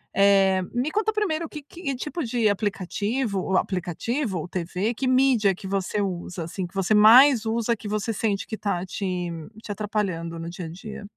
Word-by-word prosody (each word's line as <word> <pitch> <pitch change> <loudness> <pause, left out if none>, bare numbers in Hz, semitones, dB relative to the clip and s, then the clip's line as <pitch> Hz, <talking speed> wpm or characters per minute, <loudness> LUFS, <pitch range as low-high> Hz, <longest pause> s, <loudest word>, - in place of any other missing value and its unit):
Eh, 195 -1 +4
me 250 +5 0
conta 435 +3 +1
primeiro 375 -7 -1
o - - -9
q 300 - -8
q 345 - -12
que 275 -4 -1
tipo 300 +6 -4
de 230 -2 +1
aplicativo 205 +2 -1
ou 190 0 +1
aplicativo 190 - -2
ou 160 - -4
TV, 185 +5 -2
que 260 +3 -2
mídia 255 -6 +4
que 190 - -12
você 195 +1 -1
usa, 175 -2 -4
assim, 180 +3 -4
que 175 - -22
você 195 +2 +1
mais 230 +3 +7
usa, 230 +1 +1
que 210 -1 -9
você 215 +2 -1
sente 205 -1 -1
que - - -12
está 200 -4 -2
te 180 -2 -3 0.3
te - - -6
atrapalhando 195 -5 -2
no 165 +1 -6
dia 175 0 -6
a - - -6
dia? 205 +6 -8
205 Hz, 200 wpm, -25 LUFS, 185-240 Hz, 0.3 s, mais